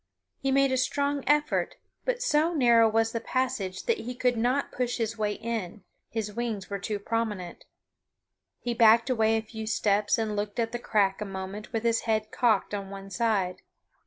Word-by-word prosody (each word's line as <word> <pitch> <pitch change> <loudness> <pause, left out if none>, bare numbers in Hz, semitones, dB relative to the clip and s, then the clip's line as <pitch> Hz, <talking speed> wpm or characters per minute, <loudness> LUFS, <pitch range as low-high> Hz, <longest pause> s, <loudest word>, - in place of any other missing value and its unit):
He 270 - 0
made 275 0 +4
a 260 - +2
strong 280 +2 0
effort, 295 +1 +2 0.3
but - - 0
so 325 -5 +2
narrow 235 -5 +5
was 225 +1 +2
the 230 - -3
passage 250 -8 -2
that 465 - 0
he 250 +2 -5
could 250 0 +1
not 250 +5 0
push 245 -1 -2
his 225 -1 -2
way 210 -2 -1
in; 215 -4 -4 0.3
his 215 -2 -3
wings 220 -4 -3
were 200 - -2
too 210 +2 -2
prominent. 205 -4 -3 0.9
He 240 - -2
backed 230 +2 +5
away 225 -2 +3
a 220 - -2
few 220 0 -7
steps 205 -1 +2
and 220 -2 -1
looked 205 0 -3
at 225 -1 0
the 240 - -3
crack 205 -4 +1
a - - -2
moment 195 +2 -6
with 225 -2 -2
his 230 -1 +2
head 215 -1 0
cocked 220 -4 +2
on 200 -1 -4
one 195 0 -9
side. 195 -5 0
225 Hz, 190 wpm, -28 LUFS, 205-245 Hz, 0.9 s, narrow